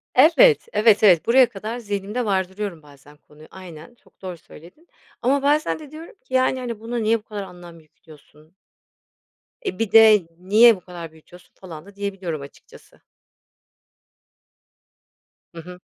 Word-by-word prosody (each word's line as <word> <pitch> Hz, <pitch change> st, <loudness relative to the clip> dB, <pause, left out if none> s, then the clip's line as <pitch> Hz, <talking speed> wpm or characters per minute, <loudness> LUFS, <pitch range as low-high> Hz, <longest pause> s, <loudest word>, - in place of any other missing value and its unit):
Evet, 390 Hz, -, +5 dB
evet, 215 Hz, -1 st, +3 dB
evet. 180 Hz, -6 st, +5 dB
Buraya 250 Hz, +1 st, +4 dB
kadar 215 Hz, +4 st, -7 dB
zihnimde 205 Hz, +2 st, -4 dB
vardırıyorum 190 Hz, -3 st, -3 dB
bazen 145 Hz, 0 st, -19 dB
konuyu. 150 Hz, +1 st, -19 dB
Aynen, 180 Hz, +3 st, -13 dB
çok -, -, -30 dB
doğru 180 Hz, -2 st, -7 dB
söyledin 180 Hz, -, -18 dB, 0.3 s
ama 275 Hz, +3 st, +1 dB
bazen 300 Hz, +3 st, 0 dB
de 300 Hz, -3 st, -13 dB
diyorum 320 Hz, +2 st, -12 dB
ki, -, -, -16 dB
yani, 260 Hz, 0 st, +1 dB
hani, 235 Hz, -3 st, -6 dB
"Buna 230 Hz, +2 st, -6 dB
niye 225 Hz, 0 st, 0 dB
bu -, -, -26 dB
kadar 210 Hz, -3 st, -7 dB
anlam 175 Hz, -2 st, -13 dB
yüklüyorsun?" 155 Hz, +1 st, -21 dB, 1.1 s
Eee, 390 Hz, -, -5 dB
bir 225 Hz, -3 st, -2 dB
de 215 Hz, -5 st, +6 dB
"niye 215 Hz, +5 st, +5 dB
bu -, -, -13 dB
kadar 170 Hz, -3 st, -10 dB
büyütüyorsun?" 170 Hz, +3 st, -19 dB
falan 165 Hz, -3 st, -12 dB
da 200 Hz, 0 st, -17 dB
diyebiliyorum 195 Hz, -6 st, -5 dB
açıkçası. 140 Hz, 0 st, -17 dB, 2.5 s
Hı 165 Hz, -, -8 dB
hı. 180 Hz, +2 st, -12 dB
200 Hz, 145 wpm, -21 LUFS, 170-235 Hz, 2.5 s, de